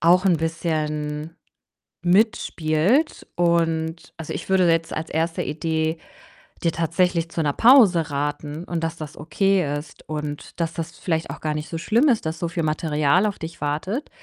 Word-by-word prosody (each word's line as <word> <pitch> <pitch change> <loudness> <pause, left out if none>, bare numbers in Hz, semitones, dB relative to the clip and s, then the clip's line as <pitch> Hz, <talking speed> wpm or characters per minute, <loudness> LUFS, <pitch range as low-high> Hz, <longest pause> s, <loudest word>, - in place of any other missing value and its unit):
auch 180 +4 +5
'n 180 - +4
bisschen 155 -1 -2 0.7
mitspielt 190 - +2
und, 165 -1 0
also, 165 - -6
ich - - -6
würde 185 -3 +4
jetzt 165 0 +1
als 160 +1 -4
1. 165 +1 -1
Idee 160 +1 -1 0.7
dir 165 - +2
tatsächlich 170 0 +1
zu 165 - -1
'ner 145 -2 +1
Pause 210 - +6
raten. 145 +3 -3
Und 170 -2 -3
dass 165 +1 -2
das 155 -2 -8
okay 170 -1 +1
ist 145 0 -10
und 150 +1 -5
dass 165 0 -1
das 165 -1 -4
vielleicht 160 -2 -1
auch - - -6
gar 155 -1 -2
nicht 150 +1 -5
so 165 - -4
schlimm 235 - +3
ist, 230 -8 +1
dass 160 +1 -2
so 170 - -2
viel 170 -1 -2
Material 155 +3 +2
auf 205 -2 -2
dich 160 -1 -8
wartet. 170 - -2
165 Hz, 170 wpm, -23 LUFS, 155-175 Hz, 0.7 s, Pause